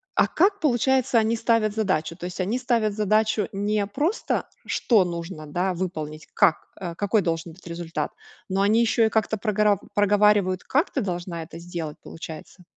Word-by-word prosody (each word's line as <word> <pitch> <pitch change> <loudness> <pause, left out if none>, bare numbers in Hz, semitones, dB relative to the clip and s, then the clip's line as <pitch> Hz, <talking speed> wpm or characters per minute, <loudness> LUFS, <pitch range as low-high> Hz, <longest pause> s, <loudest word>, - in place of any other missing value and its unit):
А - - +4
как 395 +4 +2
получается, 265 - +2
они 225 +1 +3
ставят 225 -2 +2
задачу? 185 -7 0
То 175 - -7
есть 180 - -8
они 205 +7 0
ставят 235 -5 +1
задачу 215 0 +1
не 205 +1 0
просто, 300 - -1 0.2
что 215 -7 +3
нужно, 170 -2 -6
да, 180 +5 -1
выполнить? 160 -4 -5
Как, 155 - +3
какой 195 +4 -1
должен 165 -1 -2
быть 185 - -19
результат, 170 -3 -4 0.4
но 190 +1 0
они 215 +3 +4
еще 230 0 +3
и - - -1
как-то 220 0 0
прогорар 210 -2 +2 0.2
проговаривают, 205 -2 +3
как 295 +7 +1
ты - - -1
должна 175 -3 -4
это 160 0 -9
сделать, 170 -3 -6
получается. 165 +1 -9
200 Hz, 165 wpm, -24 LUFS, 175-220 Hz, 0.4 s, А